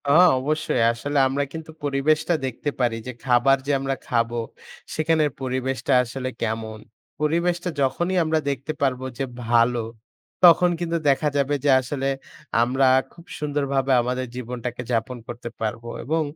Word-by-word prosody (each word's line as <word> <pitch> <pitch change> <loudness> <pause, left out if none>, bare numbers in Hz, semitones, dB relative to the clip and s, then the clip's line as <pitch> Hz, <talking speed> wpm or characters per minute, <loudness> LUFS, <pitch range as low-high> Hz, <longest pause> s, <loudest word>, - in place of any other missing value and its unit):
আ - - +5 0.3
অবশ্যই। 150 -2 0
আসলে 145 +5 -3
আমরা 140 +2 0
কিন্তু 160 0 -7
পরিবেশটা 150 +4 +1
দেখতে 130 +3 -3
পারি 120 -3 +1
যে, - - -3
খাবার 130 +2 +4
যে - - +2
আমরা 135 0 -1
খাবো 115 0 0 0.6
সেখানের 155 -1 +2
পরিবেশটা 130 +1 -1
আসলে 130 +2 -4
কেমন? 110 -1 -3 0.4
পরিবেশটা 170 +3 +1
যখনই 175 +7 0
আমরা 160 0 +1
দেখতে 140 +2 -3
পারব 130 -2 +1 0.2
যে 135 - -1 0.2
ভালো, 120 0 +3 0.6
তখন 175 0 +7
কিন্তু 170 -1 -1
দেখা 140 +2 +2
যাবে 140 +1 +1
যে - - +4
আসলে 135 +1 -3 0.6
আমরা 130 +3 +2 0.3
খুব 170 0 -16
সুন্দরভাবে 140 -2 0
আমাদের 125 +1 -2
জীবনটাকে 125 0 -5
যাপন 120 +2 -1
করতে 120 0 -6
পারব। 110 +1 -2 0.2
এবং 160 +6 0
135 Hz, 145 wpm, -23 LUFS, 125-150 Hz, 0.6 s, তখন